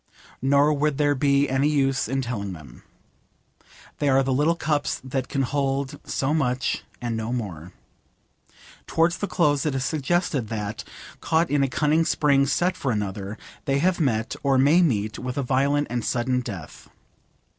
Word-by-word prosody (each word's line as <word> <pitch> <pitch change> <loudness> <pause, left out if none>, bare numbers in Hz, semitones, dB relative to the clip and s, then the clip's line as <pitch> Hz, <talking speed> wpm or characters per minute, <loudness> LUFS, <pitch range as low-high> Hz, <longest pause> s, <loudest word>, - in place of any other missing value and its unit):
Nor 140 +3 +4
would 150 -1 0
there 145 -1 +3
be 140 0 +2
any 135 +3 +1
use 135 -3 +1
in 135 0 -1
telling 100 -6 -4
them. 75 -8 -12 1.2
They 145 - +1
are 135 0 +4
the 135 0 0
little 150 +5 +2
cups 150 -3 -1
that 130 -1 -3
can 135 +1 -1
hold 140 +1 -1
so 135 +2 -1
much 130 -5 0 0.2
and 120 -2 -3
no 110 +1 -3
more. 95 -9 -5 1.1
Towards 165 +2 +1
the 205 - -2
close 145 -7 +2
it 150 -3 -1
is 130 -1 -1
suggested 145 - 0
that, 110 0 -4 0.4
caught 160 0 +1
in 145 -1 +2
a 135 - +3
cunning 155 +4 +2
spring 145 -3 +3
set 175 +6 +1
for 135 - -2
another, 100 0 -3 0.3
they 135 0 +1
have 180 +5 +1
met, 115 -8 0
or 135 -1 +2
may 145 +7 +5
meet, 110 - 0
with 125 +1 -5
a 140 - 0
violent 140 +3 +1
and 120 -2 -1
sudden 125 +2 0
death. 95 - -9
135 Hz, 165 wpm, -24 LUFS, 120-145 Hz, 1.2 s, may